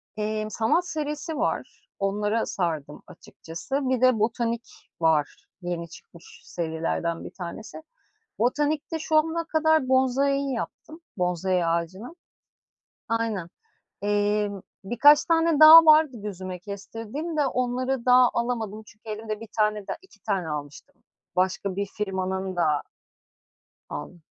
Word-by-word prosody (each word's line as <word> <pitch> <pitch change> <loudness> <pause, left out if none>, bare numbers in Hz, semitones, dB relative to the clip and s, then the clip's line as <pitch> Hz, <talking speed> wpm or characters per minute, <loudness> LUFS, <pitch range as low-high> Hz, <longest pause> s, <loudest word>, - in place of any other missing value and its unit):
Emm, 215 0 -2
sanat 225 - +1
serisi 305 0 -4
var, - - -3
onlara 210 +3 0
sardım 155 -5 -3
açıkçası. 180 +7 -6
Bir 255 -2 0
de 255 -3 +4
botanik 230 +1 -1 0.3
var, 160 -3 +1 0.2
yeni 175 -2 -4
çıkmış 170 +1 -15
serilerden 165 0 -3
bir - - -8
tanesi. 205 - -8 0.6
Botanikte 295 +6 0
şu 310 0 0
ana 325 +2 +2
kadar 315 -4 +2
bonsai'yi 270 +1 +2
yaptım, 310 +7 -7 0.2
bonsai 180 0 0
ağacını. 180 - -3 0.9
Aynen, 225 -6 -1 0.5
emm, 205 -1 0 0.2
birkaç 290 +8 +5
tane 325 -2 +2
daha 320 +1 +11
vardı 305 -4 +6
gözüme 185 -3 -6
kestirdiğim 225 - -6
de 295 -2 +2
onları 255 0 -1
daha 250 0 +6
alamadım 225 -3 -2
çünkü 215 +1 -17
elimde 215 0 -5
bir 225 - -9
tane 210 0 +2
de - - -4
2 235 - -21
tane 195 -6 -1
almıştım 145 -1 -7 0.4
başka 185 +1 0
bir 200 0 -1
firmanın 190 -2 -3
da 155 -4 +1 1.1
aldım. 175 - -7
215 Hz, 120 wpm, -25 LUFS, 185-270 Hz, 1.1 s, daha